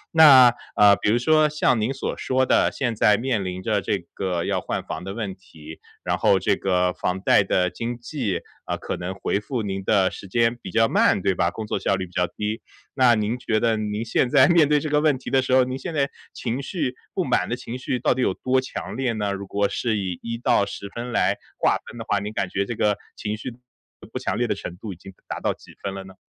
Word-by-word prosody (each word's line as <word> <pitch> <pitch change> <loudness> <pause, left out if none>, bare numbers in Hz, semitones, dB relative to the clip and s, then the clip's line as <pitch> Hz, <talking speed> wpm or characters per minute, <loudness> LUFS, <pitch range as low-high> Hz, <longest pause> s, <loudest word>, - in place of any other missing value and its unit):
那 130 -6 +9 0.2
呃， 100 -1 +7
比 105 - 0
如 115 - +3
说 155 +4 +3
像 150 -5 +2
您 115 - 0
所 135 - -4
说 130 0 +1
的， - - +3
现 120 -4 -2
在 105 0 +4
面 115 -5 -1
临 95 0 -5
着 105 -2 +1
这 100 - 0 0.2
个 90 -3 -2
要 - - 0
换 - - -3
房 - - -6
的 95 - -5
问 105 -5 -3
题， 80 -4 -13 0.2
然 - - 0
后 95 - +4
这 100 +2 +1
个 90 -1 +1
房 90 +1 -2
贷 100 - +4
的 90 -1 +1
经 120 +1 -4
纪， 120 - -3 0.2
啊， - - -2
可 - - -4
能 90 +2 -5
回 100 +1 -1
复 120 +1 -3
您 95 -1 -4
的 95 -2 +3
时 100 - -9
间 115 +3 +2
比 - - -7
较 115 0 +3
慢， - - +3
对 95 -1 +2
吧？ 85 -1 +1
工 110 +4 -6
作 - - -2
效 100 - +1
率 95 0 -3
比 90 - -17
较 90 0 0
低。 105 +2 -4 0.3
那 125 -3 +5
您 110 +3 -1
觉 110 -2 0
得 115 -1 +2
您 105 +1 -3
现 120 +2 +1
在 140 0 +6
面 170 -4 +4
对 150 0 +4
这 155 - -4
个 150 0 +2
问 150 -4 +3
题 - - -8
的 135 - +4
时 130 - -4
候， 130 0 +6
您 130 +1 -3
现 165 +5 -5
在 140 -1 +2 0.3
情 125 +3 -3
绪 135 -3 -3 0.2
不 - - +1
满 - - +1
的 - - 0
情 115 - -7
绪 125 0 -2
到 - - +2
底 130 - -2
有 95 - +2
多 130 0 +1
强 130 - -6
烈 130 -3 -1
呢？ 105 -2 -2
如 100 0 -6
果 100 +1 +1
是 115 -3 -1
以 95 -4 -3
1 115 0 -4
到 115 - +2
10 100 - -7
分 120 +1 -5
来 - - +2 0.2
划 - - +3
分 120 - -10
的 115 - -6
话， 100 - +1
您 105 +1 -5
感 100 -2 -1
觉 100 +1 -1
这 120 - -3
个 105 -1 +2 0.2
情 105 -1 -3
绪 125 - -6
不 115 - -15 0.6
不 - - -2
强 - - -2
烈 - - +1
的 - - +1
程 90 0 -8
度， 100 -1 -7
已 - - -12
经 95 +3 -12 0.2
达 - - -4
到 - - 0
几 - - -17
分 100 -1 -4
了 95 - -6
呢？ 95 0 -13
110 Hz, 270 characters per minute, -23 LUFS, 95-125 Hz, 0.6 s, 那